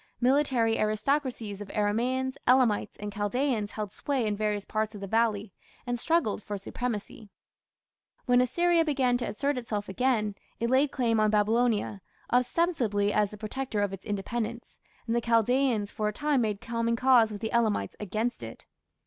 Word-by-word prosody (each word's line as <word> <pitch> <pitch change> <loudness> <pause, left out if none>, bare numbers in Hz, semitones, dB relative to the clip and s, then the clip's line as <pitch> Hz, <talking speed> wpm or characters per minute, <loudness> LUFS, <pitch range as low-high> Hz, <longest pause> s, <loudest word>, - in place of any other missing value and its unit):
Military 250 -3 +2
aristocracies 215 -1 -1
of 205 - -8
Aramaeans, 250 +6 0
Elamites, 250 -4 +3
and 205 0 -5
Chaldaeans 215 +1 -1
held 210 -2 -4
sway 270 -5 -1
in 210 -1 0
various 210 -1 -1
parts 215 0 -2
of 205 - -8
the - - -4
valley, 215 -1 0 0.3
and 245 -1 -2
struggled 315 -9 +1
for 205 0 -5
supremacy. 215 0 -5 1.0
When 245 0 +4
Assyria 345 +6 +3
began 265 -5 +1
to 245 - -3
assert 280 +4 -1
itself 210 -4 -4
again, 215 0 0 0.3
it 235 +1 0
laid 270 +3 +4
claim 235 -5 +1
on 215 0 +3
Babylonia, 215 -1 +1 0.3
ostensibly 245 - +1
as 210 -1 +2
the 210 - -10
protector 220 +1 -3
of 200 -1 -2
its 195 - -8
independence, 225 +3 -4 0.3
and 230 0 -1
the 235 - +2
Chaldaeans 230 -1 +2
for 215 - -2
a 210 - -1
time 295 +1 +1
made 210 -3 -1
common 230 0 -1
cause 240 -3 +4
with 205 -1 -7
the 220 - -3
Elamites 230 -3 +1
against 215 +4 -2
it. - - -9
230 Hz, 165 wpm, -28 LUFS, 210-255 Hz, 1.0 s, When